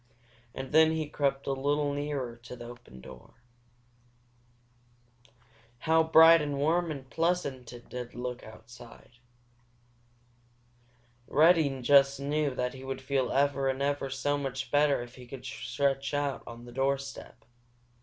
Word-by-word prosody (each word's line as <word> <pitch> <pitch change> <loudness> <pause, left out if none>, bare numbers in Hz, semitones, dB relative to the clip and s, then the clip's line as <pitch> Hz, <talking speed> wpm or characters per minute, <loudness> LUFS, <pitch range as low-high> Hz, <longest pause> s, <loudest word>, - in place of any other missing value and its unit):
And 135 0 -6
then 160 +1 +5
he 160 -1 -2
crept 140 -2 -1
a - - -1
little 145 +2 0
nearer 140 -4 -3
to 120 +1 -11
the 120 -1 -10
open 120 - -12
door. - - -14 2.4
How 160 +5 +3
bright 160 0 +7
and 145 -2 -3
warm 165 +4 +1
and 140 -4 -6
pleasant 155 -6 -2
it 120 -1 -12
did 125 -1 -7
look 125 0 -5
outside! 120 +2 -14 2.1
Reddy 155 -5 +3
just 140 +1 +5
knew 145 -1 -1
that 125 -1 -2
he 130 0 -10
would 135 0 -5
feel 130 -2 0
ever 140 0 +1
and 135 +1 -2
ever 140 -1 -1
so 145 +2 -1
much 135 -2 -4
better 145 -3 +3
if 120 0 -13
he 125 -1 -12
could 130 +1 -10
stretch 140 0 -2
out 145 -1 -1
on 120 0 -10
the 120 - -11
doorstep. 135 -2 -3
135 Hz, 140 wpm, -29 LUFS, 125-145 Hz, 2.4 s, bright